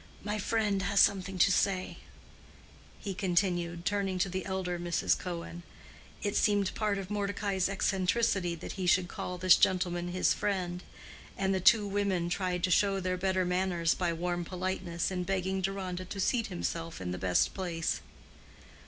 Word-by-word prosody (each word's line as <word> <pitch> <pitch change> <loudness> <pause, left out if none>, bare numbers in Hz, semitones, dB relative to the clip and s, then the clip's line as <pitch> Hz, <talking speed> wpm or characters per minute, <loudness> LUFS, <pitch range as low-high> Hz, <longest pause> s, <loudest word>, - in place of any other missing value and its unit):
My 210 0 -2
friend 205 -2 0
has 200 +1 +1
something 195 -1 +3
to 195 - +5
say," 185 0 0 1.0
he 200 - -4
continued, 175 -2 0
turning 195 -2 0
to 185 +1 +1
the 185 +1 -4
elder 185 -2 -2
Mrs. 175 -1 +1
Cohen. 170 -1 -6 0.6
It 205 -1 -1
seemed 205 -2 +2
part 210 -2 0
of 195 0 -6
Mordecai's 200 -2 -1
eccentricity 190 -1 +1
that 165 - -7
he 185 -2 -3
should 180 0 +4
call 180 +1 -5
this 185 0 +6
gentleman 175 -1 +1
his 180 +1 +2
friend; 180 -3 -2 0.6
and 195 0 +1
the 190 - +1
two 205 +3 +5
women 195 -4 0
tried 180 -1 -1
to 185 - +2
show 195 +2 +3
their 185 0 -1
better 185 0 0
manners 180 -2 +1
by 175 -2 -1
warm 175 +1 -2
politeness 180 -1 -3
in 180 -1 -2
begging 190 0 -1
Deronda 185 -1 -3
to 195 +2 -7
seat 230 +4 +1
himself 165 -3 -4
in 90 -1 -4
the 90 - -4
best 90 0 +2
place. 170 -4 -2
185 Hz, 160 wpm, -30 LUFS, 175-195 Hz, 1.0 s, this